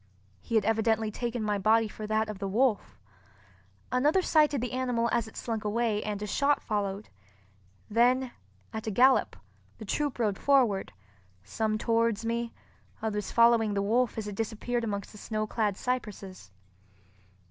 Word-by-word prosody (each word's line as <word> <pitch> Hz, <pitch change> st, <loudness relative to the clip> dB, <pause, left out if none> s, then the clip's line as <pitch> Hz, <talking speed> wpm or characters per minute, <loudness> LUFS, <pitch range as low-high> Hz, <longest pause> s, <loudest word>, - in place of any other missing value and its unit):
He 230 Hz, -, -4 dB
had 215 Hz, -3 st, +3 dB
evidently 220 Hz, -1 st, +1 dB
taken 240 Hz, +1 st, -3 dB
my 210 Hz, -1 st, 0 dB
body 220 Hz, +3 st, +3 dB
for 215 Hz, +1 st, -8 dB
that 215 Hz, 0 st, +1 dB
of 210 Hz, -3 st, -6 dB
the 200 Hz, -, -3 dB
wolf. 225 Hz, +2 st, 0 dB, 0.9 s
Another 295 Hz, +9 st, +3 dB
sighted 300 Hz, -4 st, +3 dB
the 245 Hz, +1 st, -3 dB
animal 245 Hz, -2 st, 0 dB
as 235 Hz, -2 st, 0 dB
it 220 Hz, -, -13 dB
slunk 225 Hz, -2 st, -3 dB
away, 215 Hz, 0 st, 0 dB
and 210 Hz, -1 st, -3 dB
a -, -, -2 dB
shot 280 Hz, +8 st, +1 dB
followed. 205 Hz, -1 st, -3 dB, 0.8 s
Then, 245 Hz, +3 st, +2 dB, 0.4 s
at 220 Hz, 0 st, -5 dB
a -, -, +1 dB
gallop, 255 Hz, +5 st, +4 dB, 0.4 s
the 220 Hz, -, -9 dB
troop 290 Hz, +6 st, -1 dB
rode 210 Hz, -5 st, 0 dB
forward—some 105 Hz, -, -1 dB
towards 230 Hz, -1 st, +1 dB
me, 235 Hz, 0 st, -2 dB, 0.5 s
others 210 Hz, -2 st, -3 dB
following 230 Hz, -3 st, +4 dB
the 200 Hz, -, 0 dB
wolf 235 Hz, +4 st, +1 dB
as 215 Hz, -1 st, -3 dB
it 205 Hz, -, -5 dB
disappeared 225 Hz, +3 st, -2 dB
amongst 200 Hz, -3 st, -4 dB
the 210 Hz, -, -12 dB
snow 215 Hz, 0 st, -2 dB
clad 210 Hz, -2 st, -1 dB
cypresses. 205 Hz, -, -4 dB
220 Hz, 155 wpm, -29 LUFS, 210-240 Hz, 0.9 s, gallop